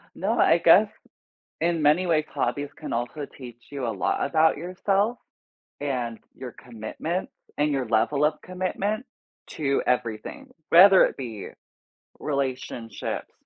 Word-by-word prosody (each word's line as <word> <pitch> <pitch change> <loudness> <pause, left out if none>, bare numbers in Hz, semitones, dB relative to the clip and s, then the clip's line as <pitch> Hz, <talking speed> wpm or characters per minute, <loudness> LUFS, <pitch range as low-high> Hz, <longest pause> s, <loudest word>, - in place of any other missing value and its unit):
No, - - -1
I - - +5
guess - - +6 0.7
in 165 -1 +1
many 155 +5 +3
ways, 155 -2 +2
hobbies 140 +1 -2
can - - -6
also 120 +5 -3
teach 120 -3 -13
you 135 -3 -4
a - - -1
lot 100 - -1
about 160 -2 +3
yourself 195 +7 0 0.6
and 125 -5 -2 0.2
your 130 -2 -8
commitment 125 - -5 0.3
and 150 +1 +2
your 135 -4 -1
level 120 +7 +2
of 150 0 +1
commitment 195 +5 -2 0.4
to 140 -3 -1
everything, 125 - -2 0.2
whether 190 +3 +8
it - - -1
be 115 -6 -6 0.7
relationships 130 -6 -4
145 Hz, 130 wpm, -25 LUFS, 120-170 Hz, 0.7 s, whether